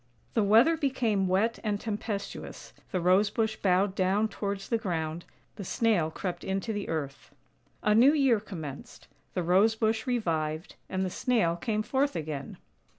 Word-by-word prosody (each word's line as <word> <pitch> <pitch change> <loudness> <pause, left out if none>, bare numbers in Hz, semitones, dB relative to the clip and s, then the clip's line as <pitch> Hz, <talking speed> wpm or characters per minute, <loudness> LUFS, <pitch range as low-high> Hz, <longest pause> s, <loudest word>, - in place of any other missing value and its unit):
The 225 - +2
weather 225 +11 +5
became 235 - +1
wet 200 +5 +1
and 210 -2 -1
tempestuous, 210 -2 -5 0.2
the 185 - 0
Rose 185 +4 +4
bush 220 0 -1
bowed 190 +1 +2
down 195 +3 +1
towards 200 -1 -4
the 230 - 0
ground, 165 -5 -3 0.3
the 205 - -5
Snail 190 -5 +1
crept 175 +1 -5
into 195 +4 -2
the 205 -1 -4
earth. 145 -4 -4 0.5
A 210 - +4
new 245 +6 +7
year 270 -7 +3
commenced, 190 - -9 0.3
the 180 - 0
Rose 195 +6 +4
bush 220 +1 0
revived, 160 -9 -1 0.2
and 190 0 -1
the 185 - -3
Snail 215 -10 +1
came 215 +4 -1
forth 275 +4 0
again. 150 -4 -5
200 Hz, 155 wpm, -29 LUFS, 180-225 Hz, 0.5 s, new